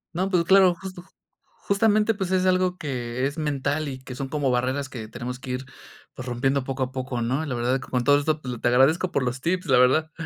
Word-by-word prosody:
No, 185 +3 0
pues 180 -3 +2
claro, 190 0 +5
justo 185 0 -9 0.4
justamente, 215 +2 +1
pues 190 -3 -4
es 185 0 +2
algo 185 -1 +2
que 125 -4 -3
es 145 +3 -7
mental 150 0 -1
y 130 -1 -6
que 130 - -8
son 135 +2 -4
como 140 -2 0
barreras 130 +3 -1
que 115 -4 -7
tenemos 125 +3 -6
que 130 -1 -7
ir, 125 +1 -4 0.5
pues 130 - -8
rompiendo 130 +2 0
poco 135 0 -2
a 130 - -4
poco, 130 -2 -4
¿no?, 130 +7 -1
y - - -7
la 130 - -2
verdad 125 +3 0
que 130 - -10
con 125 -1 0
todo 145 +3 +5
esto, 155 +1 -1
pues 125 -4 -5
te - - 0
agradezco 135 +9 +3
por 140 - 0
los 125 +1 -2
tips, 180 +5 -1
la 135 - +4
verdad. 135 +6 +3
135 Hz, 240 wpm, -24 LUFS, 125-175 Hz, 0.5 s, claro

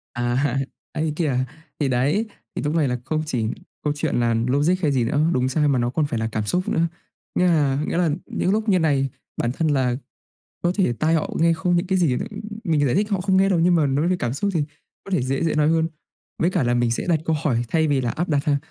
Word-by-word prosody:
À, 125 +3 0 0.3
ấy 155 - -2
thế 150 - -1
kìa. 150 -7 0 0.4
Thì 145 - +1
đấy, 140 - +1 0.3
thì - - -2
lúc 150 +2 -1
này 150 -4 +3
là 125 0 -1
không 155 0 -1
chỉ 125 -7 -1 0.4
câu 150 -1 +1
chuyện 145 - -1
là 115 -1 +2
logic 145 +7 +3
hay 150 -4 +2
gì 130 -3 +2
nữa, 145 +6 +1
đúng 130 +1 +1
sai 150 +2 +2
mà 135 -3 +2
nó 120 0 +1
còn 150 +4 0
phải 120 -6 -2
là 110 - -1
cảm 110 -1 -1
xúc 180 - -1
nữa. 165 +1 +2 0.5
Nghĩa 180 - +3
là 145 -5 +2
nghĩa - - -1
là 175 -3 +3 0.2
những 185 - -1
lúc 215 +1 0
như 185 -2 +4
này, 140 -4 +2 0.3
bản 120 - 0
thân 160 +4 -1
là 130 -4 +2 0.7
có 175 - +2
thể 185 -12 +2
tai 155 +7 +1
họ 160 - 0
nghe 165 +1 +4
không 175 +2 +1
những 175 - 0
cái 190 0 +1
gì 145 -8 +2
nữa, - - -3 0.4
mình 155 -5 +2
giải 125 - +1
thích 210 +3 +1
họ 195 -2 +1
không 190 0 +2
nghe 195 +1 +4
đâu 175 -4 +2
nhưng 175 +1 +4
mà 155 -3 +3
nói 140 +5 +1
về 185 - +2
cảm 120 0 -1
xúc 200 +8 -1
thì 155 - +1 0.4
có 195 - -10
thể 180 -9 +1
dễ 135 +3 -1
dễ 160 - +1
nói 150 0 +3
hơn. 165 0 +2 0.5
Với 175 - +2
cả 180 -6 +1
là 120 0 +1
mình 120 -1 +2
sẽ 120 - -1
đặt 160 -3 +3
câu 160 - +1
hỏi 120 -6 +1
thay 160 -1 +2
vì 140 -2 +2
là 120 -2 -1
áp 175 +7 -2
đặt 145 -2 +1
ha. 145 -2 +2
150 Hz, 270 wpm, -23 LUFS, 130-170 Hz, 0.7 s, như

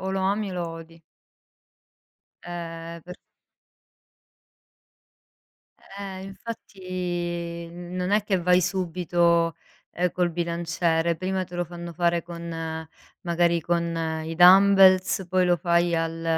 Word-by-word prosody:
o 190 - -3
lo 190 0 -1
ami 200 +2 0
o - - -6
lo 175 -2 -3
odi. 165 0 -11 1.4
Ehm, 170 -1 -7
per 180 +2 -10 2.8
Eh, 190 -2 -6
infatti. 180 -4 -5
Non 180 +1 -5
è 210 +1 +3
che 195 -3 0
vai 180 +1 +4
subito, 175 -2 +1 0.4
ehm, 180 +1 0
col 180 -1 +1
bilanciere, 170 0 0
prima 185 +2 -2
te 180 0 -13
lo 175 0 -1
fanno 170 0 -8
fare 170 0 +1
con, 165 -1 -6 0.3
magari 170 0 +1
con 165 -1 -1
i 165 +1 -5
dumbbells, 190 +1 +6
poi 185 0 +2
lo 175 0 +3
fai 170 -1 +2
al 165 0 -2
175 Hz, 115 wpm, -25 LUFS, 170-185 Hz, 2.8 s, dumbbells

